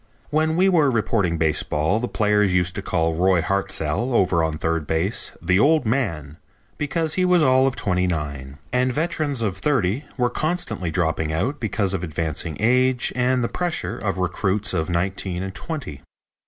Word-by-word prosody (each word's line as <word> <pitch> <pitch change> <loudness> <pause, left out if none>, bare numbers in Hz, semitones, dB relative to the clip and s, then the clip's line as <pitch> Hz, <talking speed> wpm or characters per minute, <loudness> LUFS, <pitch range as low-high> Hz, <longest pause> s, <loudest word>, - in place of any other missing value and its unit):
When 155 +1 +1
we 185 +3 +4
were 165 -7 +4
reporting 105 -7 0
baseball 80 +3 +1
the 125 - -2
players 105 -3 +2
used 90 -1 +2
to 100 - -4
call 80 -3 0
Roy 90 +2 +3
Hartzell, 100 - -1
over 85 -5 +3
on 80 -1 -1
third 80 -1 -1
base, 85 +7 0
"the 95 +1 +3
old 150 +2 +4
man," 85 - -2 0.4
because 155 +2 -1
he 185 - +1
was 180 -2 +4
all 130 -1 +4
of 135 - -1
twenty 90 -2 0
nine, 70 -5 -4 0.2
and 125 +1 +2
veterans 150 -4 -1
of 95 -4 -2
thirty 125 +1 0
were 125 -2 +1
constantly 140 - -2
dropping 80 -2 -1
out 125 - -1
because 100 -4 -1
of 95 - -2
advancing 80 -1 -3
age 125 +2 +2
and 125 0 +1
the - - +1
pressure 175 +3 -3
of 95 -2 -3
recruits 95 +3 0
of 80 -1 -1
nineteen 90 +1 -2
and 95 0 -5
twenty. 110 - -6
100 Hz, 170 wpm, -22 LUFS, 85-130 Hz, 0.4 s, we